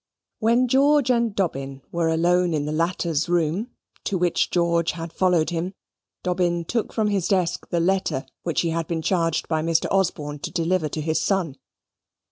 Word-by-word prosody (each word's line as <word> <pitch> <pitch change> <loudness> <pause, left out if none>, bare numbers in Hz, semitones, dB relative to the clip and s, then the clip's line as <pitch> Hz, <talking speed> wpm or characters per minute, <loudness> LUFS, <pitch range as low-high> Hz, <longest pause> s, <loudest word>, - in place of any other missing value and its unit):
When 235 +3 +3
George 275 +1 +4
and 235 -4 +1
Dobbin 135 -7 -2
were 170 -1 0
alone 175 +1 +2
in 145 -1 -1
the 150 - -3
latter's 165 0 0
room, 175 +6 0 0.4
to 195 - 0
which 175 -1 +1
George 170 -1 +1
had 165 -1 -7
followed 180 -3 +2
him, 175 +3 -3 0.5
Dobbin 175 -2 0
took 230 +5 -2
from 215 -1 0
his 195 -4 0
desk 180 -3 0
the 170 - 0
letter 185 -6 0 0.2
which 170 - 0
he 170 - -1
had 165 -1 -2
been 165 -2 -2
charged 165 -3 0
by 160 -1 0
Mr. 165 0 +1
Osborne 150 -6 0
to - - -4
deliver 170 -1 0
to 155 - -4
his 160 +1 0
son. 185 -8 0
170 Hz, 175 wpm, -24 LUFS, 160-190 Hz, 0.5 s, George